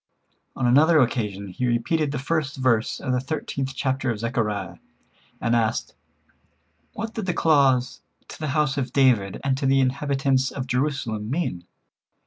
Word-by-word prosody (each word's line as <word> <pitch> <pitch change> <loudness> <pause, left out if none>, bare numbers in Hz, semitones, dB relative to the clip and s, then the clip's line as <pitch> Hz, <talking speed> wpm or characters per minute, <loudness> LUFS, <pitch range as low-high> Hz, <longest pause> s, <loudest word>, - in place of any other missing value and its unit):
On 130 - -1
another 155 +7 +5
occasion 105 -6 -1
he 125 +7 -2
repeated 140 +6 0
the 145 - -3
first 150 +1 -2
verse 120 -4 +1
of 130 - -2
the 125 - +2
thirteenth 135 -1 -4
chapter 130 -1 -1
of 115 - -1
Zechariah, 105 -6 -2 0.6
and 120 0 +1
asked: 115 -2 0 1.0
"What 225 +1 -5
did 220 -5 -4
the 175 - 0
clause 135 -5 +3 0.3
'To - - -11
the 155 - -3
house 150 -1 +1
of 130 - -4
David 120 -8 +3
and 135 -1 +1
to 135 - 0
the 135 0 +4
inhabitants 135 0 +1
of 130 - -5
Jerusalem' 125 -5 -2
mean?" 125 - -2
130 Hz, 155 wpm, -24 LUFS, 115-140 Hz, 1.0 s, another